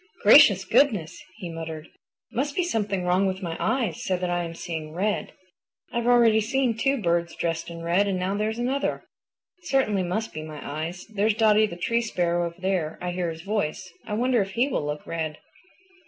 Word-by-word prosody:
"Gracious -, -, +7 dB
goodness!" 210 Hz, -, +2 dB
he 190 Hz, -6 st, -6 dB
muttered, 160 Hz, -1 st, -6 dB
"it -, -, -22 dB, 0.4 s
must 280 Hz, +4 st, -1 dB
be 365 Hz, -, +1 dB
something 210 Hz, -, -1 dB
is -, -, -4 dB
wrong 185 Hz, +2 st, +3 dB
with 190 Hz, +1 st, -3 dB
my 165 Hz, -2 st, -3 dB
eyes 245 Hz, -2 st, -1 dB
so 190 Hz, -6 st, 0 dB
that 180 Hz, 0 st, -2 dB
I 175 Hz, 0 st, 0 dB
am 165 Hz, 0 st, -6 dB
seeing 160 Hz, -2 st, -5 dB
red. 200 Hz, +5 st, -1 dB, 0.6 s
I've 235 Hz, 0 st, -1 dB
already 235 Hz, -3 st, +5 dB
seen 245 Hz, +1 st, +1 dB
two 275 Hz, +4 st, +1 dB
birds 170 Hz, -3 st, 0 dB
dressed 165 Hz, 0 st, -2 dB
in 165 Hz, 0 st, -8 dB
red 180 Hz, +4 st, +2 dB
and 195 Hz, -2 st, 0 dB
now 185 Hz, +2 st, -1 dB
there's 215 Hz, +2 st, -1 dB
another. 260 Hz, +4 st, -1 dB, 0.6 s
It 350 Hz, -, -14 dB
certainly 260 Hz, -, +2 dB
must 185 Hz, +5 st, -2 dB
be 155 Hz, -, -5 dB
my 155 Hz, -1 st, -8 dB
eyes. 160 Hz, +5 st, -5 dB
There's 215 Hz, 0 st, 0 dB
Dotty 215 Hz, -1 st, +4 dB
the 170 Hz, -, -8 dB
Tree 230 Hz, +6 st, +1 dB
Sparrow 175 Hz, -6 st, 0 dB
over 170 Hz, +2 st, -11 dB
there; 180 Hz, -4 st, -1 dB
I 180 Hz, 0 st, -3 dB
hear 175 Hz, -1 st, -2 dB
his 165 Hz, 0 st, -7 dB
voice. 190 Hz, -3 st, -2 dB
I 210 Hz, -, -4 dB
wonder 245 Hz, 0 st, +2 dB
if 195 Hz, 0 st, -4 dB
he 245 Hz, +6 st, +2 dB
will 275 Hz, -, -1 dB
look 150 Hz, 0 st, -4 dB
red." 160 Hz, -2 st, -3 dB
190 Hz, 205 wpm, -25 LUFS, 170-225 Hz, 0.6 s, Gracious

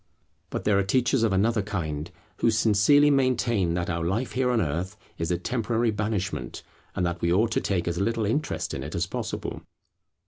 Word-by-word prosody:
But -, -, -4 dB
there 100 Hz, -2 st, +3 dB
are -, -, +2 dB
teachers 125 Hz, +5 st, +2 dB
of 115 Hz, -2 st, +2 dB
another 110 Hz, +4 st, +2 dB
kind, 85 Hz, -7 st, -4 dB, 0.3 s
who -, -, +2 dB
sincerely 115 Hz, +7 st, +4 dB
maintain 120 Hz, -9 st, +2 dB
that 90 Hz, -1 st, -1 dB
our 85 Hz, -1 st, -2 dB
life 105 Hz, +9 st, -1 dB
here 125 Hz, 0 st, +1 dB
on 120 Hz, -2 st, +2 dB
earth 90 Hz, +5 st, -2 dB, 0.2 s
is 85 Hz, -, -1 dB
a 90 Hz, -, +1 dB
temporary 115 Hz, +3 st, 0 dB
banishment, 105 Hz, -, -3 dB, 0.3 s
and 90 Hz, -, 0 dB
that 85 Hz, 0 st, -3 dB
we 85 Hz, -, +1 dB
ought 110 Hz, +6 st, +3 dB
to -, -, +1 dB
take 90 Hz, -3 st, -1 dB
as 85 Hz, 0 st, -1 dB
little 115 Hz, +1 st, 0 dB
interest 145 Hz, +9 st, -1 dB
in -, -, -4 dB
it -, -, -6 dB
as -, -, 0 dB
possible. -, -, -5 dB
105 Hz, 195 wpm, -26 LUFS, 90-115 Hz, 0.3 s, sincerely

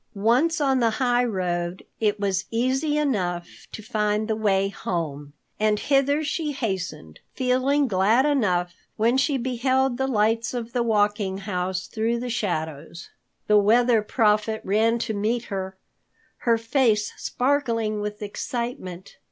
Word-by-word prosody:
Once 250 Hz, +12 st, +2 dB
on 270 Hz, -3 st, +2 dB
the 230 Hz, -2 st, +1 dB
highroad, 190 Hz, -9 st, 0 dB
it 210 Hz, -2 st, +1 dB
was 195 Hz, -2 st, 0 dB
easy 265 Hz, +6 st, 0 dB
enough 185 Hz, -12 st, -2 dB
to 215 Hz, -, -8 dB
find 210 Hz, -1 st, 0 dB
the 220 Hz, -, 0 dB
way 195 Hz, -3 st, +2 dB
home, 155 Hz, -7 st, -4 dB, 0.3 s
and 215 Hz, 0 st, +2 dB
hither 280 Hz, +2 st, +2 dB
she 300 Hz, 0 st, -2 dB
hastened, 190 Hz, -, -4 dB, 0.2 s
feeling 260 Hz, +3 st, +2 dB
glad 215 Hz, +5 st, +3 dB
enough 185 Hz, -12 st, +1 dB, 0.2 s
when 230 Hz, +3 st, +3 dB
she 270 Hz, +1 st, +2 dB
beheld 260 Hz, +1 st, 0 dB
the 265 Hz, -, +1 dB
lights 225 Hz, 0 st, +1 dB
of 235 Hz, -1 st, -5 dB
the 245 Hz, -, +1 dB
Walking 205 Hz, -3 st, +1 dB
House 185 Hz, -2 st, -3 dB
through 230 Hz, +2 st, -1 dB
the 245 Hz, 0 st, -4 dB
shadows. 165 Hz, -7 st, -4 dB, 0.3 s
The 210 Hz, 0 st, +5 dB
Weather 230 Hz, +2 st, +4 dB
Prophet 215 Hz, 0 st, +1 dB
ran 220 Hz, +4 st, +2 dB
to 230 Hz, -1 st, -3 dB
meet 220 Hz, +3 st, -1 dB
her, 190 Hz, 0 st, -4 dB, 0.6 s
her 230 Hz, -1 st, +2 dB
face 225 Hz, -2 st, +1 dB
sparkling 230 Hz, -6 st, 0 dB
with 210 Hz, 0 st, -5 dB
excitement. 205 Hz, -4 st, -5 dB
220 Hz, 135 wpm, -24 LUFS, 195-250 Hz, 0.6 s, The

